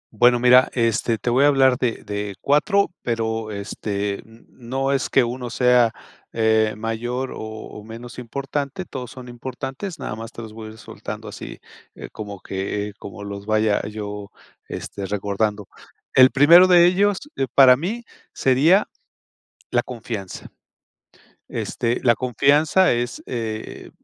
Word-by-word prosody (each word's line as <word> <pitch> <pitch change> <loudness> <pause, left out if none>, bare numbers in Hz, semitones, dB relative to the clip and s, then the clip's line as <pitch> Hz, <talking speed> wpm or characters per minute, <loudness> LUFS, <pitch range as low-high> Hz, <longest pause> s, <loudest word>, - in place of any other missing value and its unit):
Bueno, 120 +2 +5
mira, 125 +1 +6
este, 115 -1 +1
te 120 - -2
voy 130 +3 +4
a - - +6
hablar 135 -3 +4
de 120 -2 -1
de 105 -1 -4
4, 180 +7 +2
pero 115 -2 -2
este 100 0 -4 0.3
no 135 +3 -3
es 135 -2 0
que 135 - +4
1 120 +1 -4
sea, 125 -2 +4 0.4
eh, 110 -1 +2
mayor 120 +4 -3
o - - -8
o 110 -1 -8
menos 115 +2 -9
importante, 140 +7 -4
todos 125 -5 -7
son 125 -1 -11
importantes, 135 - -6
nada 105 - -5
más, 115 +2 -8
te 115 - -9
los 110 -1 -10
voy 110 -1 -8
a - - -9
ir - - -15
soltando - - -8
así, - - -8 0.4
eh, - - -9
como 100 -3 -8
que, 100 +2 -4
como 100 0 -9
los 100 0 -7
vaya 110 -1 +2
yo, 105 -1 -6 0.4
este, 100 -1 -6
recordando. 105 +1 -2 0.5
El 130 0 +8
primero 170 +7 +7
de 175 -2 +7
ellos, 195 +2 +3 0.2
eh, 135 - -1
para 130 -2 +7
mí 200 - -4 0.3
sería 150 +10 +3 0.8
la 120 - +1
confianza. 110 -5 -7 1.0
Este, 120 +1 -2
la 120 - +5
confianza 140 +8 +3
es, 120 +1 -3
eh, 110 -3 -5
120 Hz, 145 wpm, -22 LUFS, 110-135 Hz, 1.0 s, El